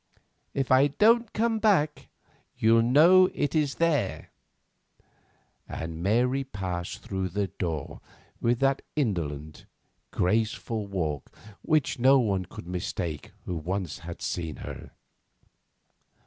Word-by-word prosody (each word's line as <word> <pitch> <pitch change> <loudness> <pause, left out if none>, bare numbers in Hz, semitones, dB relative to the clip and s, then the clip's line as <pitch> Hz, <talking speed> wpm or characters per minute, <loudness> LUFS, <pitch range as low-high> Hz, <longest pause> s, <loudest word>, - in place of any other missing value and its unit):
If 135 -2 -1
I 130 +2 +6
don't 225 - +3
come 225 0 0
back, 180 -9 +1 0.5
you'll 115 +1 +4
know 165 +10 +6
it 145 - -1
is 150 -3 +1
there," 165 -3 0 1.4
and 80 0 -5
Mary 125 +8 +2
passed 95 -8 -5
through 95 -1 -3
the 100 +2 -2
door 80 -6 -4 0.4
with 120 +1 +2
that 135 0 +2
indolent, 80 - -3 0.4
graceful 110 +2 -1
walk 80 -8 -3 0.3
which 155 -5 +1
no 135 +3 +6
one 100 -7 0
could - - -10
mistake 85 -3 -4
who 90 - -3
once 90 +1 -3
had 85 +1 -8
seen 85 -3 -3
her. - - -8
110 Hz, 115 wpm, -27 LUFS, 90-140 Hz, 1.4 s, I